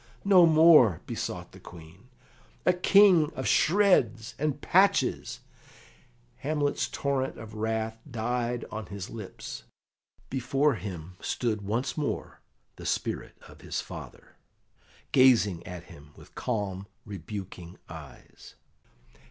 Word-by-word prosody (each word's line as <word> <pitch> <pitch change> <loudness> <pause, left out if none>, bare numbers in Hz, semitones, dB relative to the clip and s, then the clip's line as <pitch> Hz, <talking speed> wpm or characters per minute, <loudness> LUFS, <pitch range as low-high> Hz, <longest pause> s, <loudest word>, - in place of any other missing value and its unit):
"No 185 -4 +7
more!" 155 - +6
besought - - -5
the - - -14
Queen. 85 +7 -14 0.6
"A 180 - +5
king 180 -3 +5
of 130 - -3
shreds 155 - +3
and 150 -1 -1
patches 190 +6 +2 0.5
" 125 -1 -30 0.2
Hamlet's 145 +1 -1
torrent 135 -2 -2
of 110 -1 -10
wrath 110 +1 -2
died 120 +1 -2
on 110 -3 -6
his 100 0 -7
lips. 110 -5 -8 0.7
Before 135 +3 +1
him 90 -5 -7
stood 110 -4 -2
once 115 +9 -2
more 145 - -4 0.4
the - - -10
spirit - - -3
of - - -16
his - - -4
father, - - -10 0.7
gazing 115 -9 +4
at 90 -2 -7
him 75 -5 -15
with - - -16
calm, 100 -5 -3 0.2
rebuking 95 -2 -8
eyes. 75 -6 -12
115 Hz, 115 wpm, -28 LUFS, 100-145 Hz, 0.7 s, No